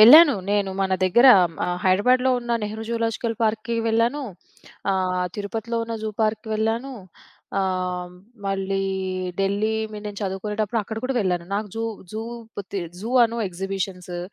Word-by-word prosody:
వెళ్ళాను. 290 +6 +10 0.2
నేను 205 -1 +1
మన 190 -1 +1
దగ్గర 235 +8 +6 0.4
ఆహ్, 180 0 -1
హైదరాబాద్‌లో 250 +8 +4
ఉన్న 240 0 -6
'నెహ్రూ 215 +1 -4
జూలాజికల్ 230 0 -1
పార్క్‌కి' 225 +1 0
వెళ్ళాను. 230 +6 +2 0.7
ఆహ్, 185 -1 +1
తిరుపతిలో 220 +3 -3
ఉన్న 230 0 -4
జూ 220 - -1
పార్క్‌‌కి 215 0 0
వెళ్ళాను. 225 +5 -1 0.7
ఆహ్, 185 -2 -1 0.4
మళ్ళీ 195 0 -1 0.6
ఢిల్లీ 200 +3 +1 0.2
మీ 210 - -5
నేను 205 -1 -6
చదువుకునేటప్పుడు 210 +3 -1
అక్కడ 220 +2 -7
కూడా 265 +1 -1
వెళ్ళాను. 180 -4 0
నాకు 210 +1 -2
జూ 225 - -1 0.3
జూ 220 - -3 0.5
తి 200 - -1 0.2
జూ 225 +4 -4
అను 230 +1 -2
ఎక్సిబిషన్సు 185 -1 -4
210 Hz, 140 wpm, -24 LUFS, 190-230 Hz, 0.7 s, వెళ్ళాను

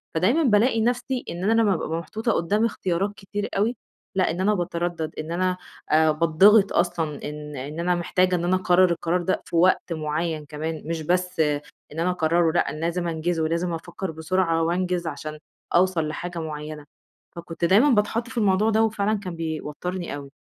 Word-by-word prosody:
فدايمًا 235 - +3
بالاقي 225 0 +3
نفسي 245 +2 -1
إن 175 +2 -5
أنا - - +4
لمّا - - +4
بابقى 165 - -1
أبقى 165 +1 -2
محطوطة 220 +8 -2
قدام 205 +7 +1
اختيارات 195 -1 -1
كتير 205 +1 -5
أوي، 225 +5 +1 0.4
لأ 185 -3 +2
إن 175 +3 -3
أنا 210 +2 +3
باتردد 175 -3 -2
إن 155 +2 -5
أنا، 185 +1 0 0.3
آآ، 155 0 +5
باتضغط 180 +7 +5
أصلًا 165 -4 -1
إن 150 0 -8
إن 145 +5 -6
أنا 175 +1 +1
محتاجة 180 +1 +1
إن 170 - -2
أنا 180 +2 +2
أقرر 185 -1 +4
القرار 170 +1 0
ده 185 +2 -1
في - - -6
وقت 175 0 +3
معيّن 155 0 -2
كمان، 155 +2 -5
مش 165 0 -3
بس 180 +2 -1
إن 150 -2 +2 0.4
أنا 175 +2 +1
أقرره 165 -1 +2
لأ 175 - +1
أنا 155 - -6
لازم 170 +1 -1
أنجزه، 165 0 -1
ولازم 170 +2 -1
أفكّر 175 +2 -5
بسرعة 165 +1 0
وأنجز 175 0 -1
عشان 155 +1 -6 0.4
أوصل 175 -3 +3
لحاجة 175 +3 -5
معيّنة. 150 -1 -6 0.5
فكنت 170 0 -4
دايمًا 210 - +5
باتحط 230 0 +1
في 245 - -9
الموضوع 205 0 +3
ده، 220 0 +3
وفعلًا 215 -1 0
كان 180 -4 -6
بيوترني 165 +2 -4
أوي. 140 -1 -9
175 Hz, 180 wpm, -24 LUFS, 160-190 Hz, 0.5 s, آآ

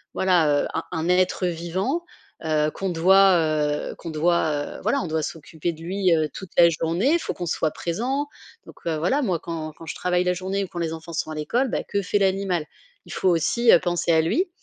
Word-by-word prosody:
voilà, 165 -6 +3
heu, - - -2
un - - -2
un 165 +1 -2
être 185 +1 +2
vivant, 185 - -2 0.4
heu, 155 -1 +1
qu'on 195 - -3
doit, 190 +2 +5
heu, 150 -2 0
qu'on 165 - -8
doit, 155 -2 0
heu, - - -10
voilà, 280 - +1
on 180 - -4
doit 160 0 -1
s'occuper 160 +2 -4
de 160 - -14
lui, 185 +1 0
heu, 155 -1 +1
toute 190 - -8
la 170 - +8
journée, 170 - +1
faut - - -4
qu'on 175 - -4
soit 160 -1 0
présent. 250 +12 -2 0.4
Donc, - - -13
heu, 160 -2 0
voilà 260 - +1
moi 185 -9 0
quand 160 -2 -5
quand 165 - -11
je - - -5
travaille 180 0 +1
la 180 - +1
journée 190 +2 -2
ou 190 - -5
quand 175 -1 -7
les 165 -1 -1
enfants 165 +1 -9
sont 160 - -2
à 155 - -5
l'école, 240 - 0
bah, - - -2
que 200 - -2
fait 200 +2 0
l'animal? 190 -4 0 0.4
Il - - -9
faut 185 - +1
aussi, 225 +8 +3
heu, - - +7
penser 175 -1 0
à 160 -1 +5
lui. 350 - 0
175 Hz, 225 wpm, -24 LUFS, 160-190 Hz, 0.4 s, la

